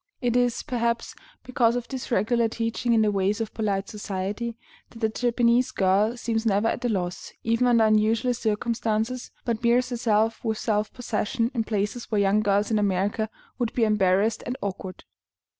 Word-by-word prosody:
It 245 -2 0
is, 245 -1 +1
perhaps, 235 -4 -1 0.3
because 245 -2 +2
of 245 -1 -3
this 265 -2 -6
regular 235 +1 +2
teaching 230 +1 -1
in 220 -1 +4
the 210 - +2
ways 200 +2 0
of 225 -1 -4
polite 200 -3 -1
society, 210 +3 -4 0.3
that - - -14
the 220 -1 0
Japanese 240 +1 +2
girl 200 +5 +2
seems 225 -1 -1
never 215 0 +2
at 245 - -3
a 245 - +1
loss, 180 -4 -3
even 230 +2 +2
under 235 -2 +5
unusual 220 +3 +3
circumstances, 225 +1 -1 0.2
but 230 -2 -1
bears 245 +1 +3
herself 225 -2 +1
with 220 -2 -1
self 210 -1 -1
possession 235 -1 -2
in 230 -3 -1
places 210 +3 -2
where 215 - +1
young 200 +1 +3
girls 205 0 +1
in 215 - +2
America 205 +2 0 0.3
would 240 -2 -1
be 240 - +1
embarrassed 210 0 +2
and 250 +2 -3
awkward. 190 -1 -5
225 Hz, 175 wpm, -25 LUFS, 210-235 Hz, 0.3 s, under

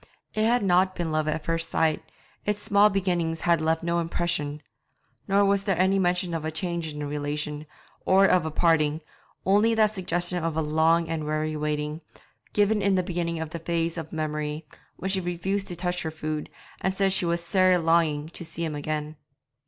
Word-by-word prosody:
It 215 0 +1
had 240 0 +3
not 185 0 +3
been 170 -2 -2
love 155 0 0
at 155 0 -1
first 165 0 -1
sight, 160 -1 +1 0.4
its 205 0 -2
small 205 -1 +5
beginnings 175 -5 -1
had 170 -2 +3
left 160 +1 +1
no 170 0 +1
impression; 165 -3 -2 0.6
nor 200 0 +4
was 200 0 +2
there 195 -2 +1
ever 180 - +3
any 195 +1 +2
mention 180 -1 +1
of 165 -2 -2
a 155 - -1
change 165 0 -3
in 150 - -9
the 150 - -3
relation, 150 +1 -3 0.4
or 195 +1 +5
of 185 -3 +4
a 160 - -2
parting, 155 -1 +2 0.4
only 210 +4 +4
that 215 -1 +3
suggestion 175 -2 -1
of 165 -1 -2
a - - +2
long 160 +2 +2
and 160 -1 -2
weary 155 0 -1
waiting, 150 +1 -2 0.5
given 210 +1 +2
in 200 -1 +2
the 185 - +2
beginning 170 -2 -2
of 160 -1 -5
this 170 - -6
phase 165 0 -1
of 160 -2 -6
memory, 155 0 -3 0.3
when 190 - -3
she 190 -1 +1
refused 190 +3 -2
to 175 - -5
touch 180 +1 -2
her 160 - -2
food, 155 -1 -4 0.3
and 190 0 0
said 195 -1 +2
she 190 - +1
was 170 0 0
'sair 185 +1 +4
longing' 165 -3 +2
to 170 - -6
see 165 0 -3
him 155 - -3
again. 150 +1 -4
170 Hz, 200 wpm, -26 LUFS, 155-185 Hz, 0.6 s, small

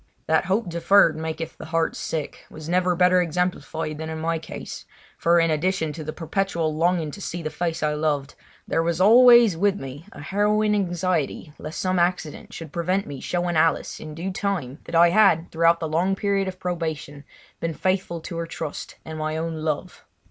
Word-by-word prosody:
That 160 0 +2
"hope 195 +3 0
deferred 170 +1 +4
maketh 160 +1 -5
the - - -7
heart 165 0 0
sick" 155 -3 -5
was 155 0 -10
never 180 +1 +2
better 180 +1 +4
exemplified 165 -2 -2
than 160 0 -4
in 160 - -4
my 165 +1 -1
case, 160 - -8 0.3
for 170 +1 +3
in 165 -1 +3
addition 160 0 0
to 160 - -7
the 155 - -4
perpetual 165 -1 -1
longing 165 -1 +1
to 200 - -9
see 175 -2 -5
the 155 - -3
face 165 -2 -2
I 150 0 +1
loved 150 -2 -1 0.3
there 165 - +1
was 170 0 -1
always 235 0 +7
with 200 +3 +1
me 135 +6 -8
a - - -12
harrowing 210 +5 +1
anxiety 175 -6 -1
lest 155 +1 -6
some 185 -1 +1
accident 175 -3 -1
should 160 -3 -8
prevent 185 +3 0
me 140 -2 -7
showing 175 +2 -1
Alice 160 +1 +1
in 155 -1 -8
due 180 +4 -4
time 180 -9 -3
that 170 - -5
I 170 +1 +6
had, 185 -5 +4
throughout 165 +1 +3
the 160 - -2
long 175 +5 +1
period 200 -1 0
of 185 -1 -6
probation, 160 -5 -4 0.4
been 165 -1 -3
faithful 185 -2 -1
to 170 - -6
her 165 0 -3
trust 160 -2 -6
and 160 0 -6
my 155 0 -2
own 165 0 -3
love. 155 +3 -3
165 Hz, 190 wpm, -24 LUFS, 155-185 Hz, 0.4 s, always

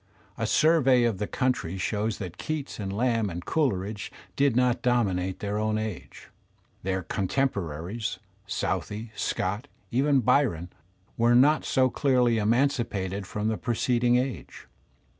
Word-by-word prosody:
A - - -2
survey 135 -6 +4
of 115 -5 0
the 105 - -2
countiy 125 -9 -1
shows 105 +3 -1
that 90 -4 -7
Keats 155 -5 -4
and 95 -2 -3
Lamb 115 0 +1
and 85 0 -6
Coleridge 105 -8 -1 0.2
did 140 -3 +2
not 125 -1 +2
dominate 95 -7 0
their 105 0 -2
own 110 0 0
age. 110 -4 -6 0.5
Their 95 0 -2
con 95 +2 -2
temporaries, 100 - -2 0.3
Southey, 110 +2 -3
Scott, 100 +5 -2 0.2
even 135 +2 +3
Biyon, 105 - +2 0.5
were 120 +1 +4
not 145 +5 +5
so 130 -1 +2
clearly 125 -5 +2
emancipated 105 -5 0
from 105 +1 -3
the 110 -1 0
preceding 120 0 +1
age. 125 - -3
115 Hz, 135 wpm, -27 LUFS, 100-125 Hz, 0.5 s, not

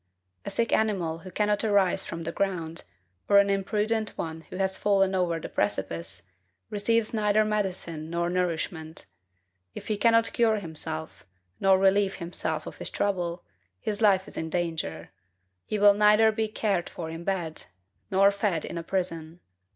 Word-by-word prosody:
A - - -2
sick 230 -1 0
animal 180 -7 +1
who 185 - -10
cannot 210 +3 +1
arise 200 -4 +2
from 165 0 -5
the 165 - -3
ground, 170 -4 -2 0.4
or 200 - +7
an 200 0 +5
imprudent 210 +2 0
one 160 -1 -4
who - - -8
has 190 0 -1
fallen 195 -2 +3
over 180 -3 +1
a 165 - -5
precipice, 90 -4 -2 0.5
receives 220 +2 +1
neither 215 -1 +3
medicine 185 -7 -2
nor 170 +1 -1
nourishment. 170 -2 -2 0.7
If - - -8
he 215 - 0
cannot 230 +1 +3
cure 225 -2 +3
himself, 160 -3 -6 0.3
nor 195 -1 +5
relieve 195 +1 +3
himself 160 -3 -3
of - - -8
his - - -2
trouble, 175 -3 -1 0.4
his 210 - -3
life 195 -3 +4
is - - -10
in 160 - -3
danger: 160 - -3 0.5
he 215 - -2
will 205 0 +7
neither 210 +2 +5
be 220 0 -1
cared 205 -4 -1
for 165 - -6
in 165 +1 -7
bed, 175 -4 -2 0.4
nor 195 +1 +5
fed 200 -5 -1
in 170 - -5
a - - -6
prison. 165 -2 -3
190 Hz, 160 wpm, -27 LUFS, 165-210 Hz, 0.7 s, or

